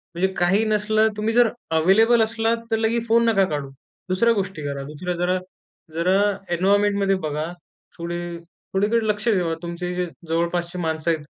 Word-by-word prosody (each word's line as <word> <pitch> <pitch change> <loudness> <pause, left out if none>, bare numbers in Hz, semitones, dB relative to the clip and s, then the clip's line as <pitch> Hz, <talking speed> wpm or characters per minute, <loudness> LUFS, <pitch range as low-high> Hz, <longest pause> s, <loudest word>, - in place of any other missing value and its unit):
म्हणजे 185 +3 +2
काही 185 +5 +3
नसलं 215 0 +2
तुम्ही 220 +2 0
जर 240 -1 +5 0.3
अवेलेबल 225 +7 +5
असलात 225 +1 0
तर 225 - +3
लगेच 230 +1 0
फोन 230 +1 +4
नका 195 -4 +3
काढू. 145 -2 -3 0.4
दुसऱ्या 230 +6 +3
गोष्टी 190 -4 -3
करा. 140 -1 -4
दुसऱ्या 155 +5 -5
जरा, 180 +1 +1 0.6
जरा 180 +4 +2 0.4
एन्व्हायर्नमेंटमध्ये 200 +1 +2
बघा. 150 +1 -2 0.5
थोडी 170 0 -4 0.2
थोडीकडे 205 +6 -2
लक्ष 210 +1 0
ठेवा. 180 -6 +1
तुमचे 170 +1 -4
जे 180 0 -1 0.2
जवळपासची 170 +1 -1
माणसं 160 0 -1
आहेत 155 -2 -3
190 Hz, 155 wpm, -23 LUFS, 170-220 Hz, 0.6 s, जर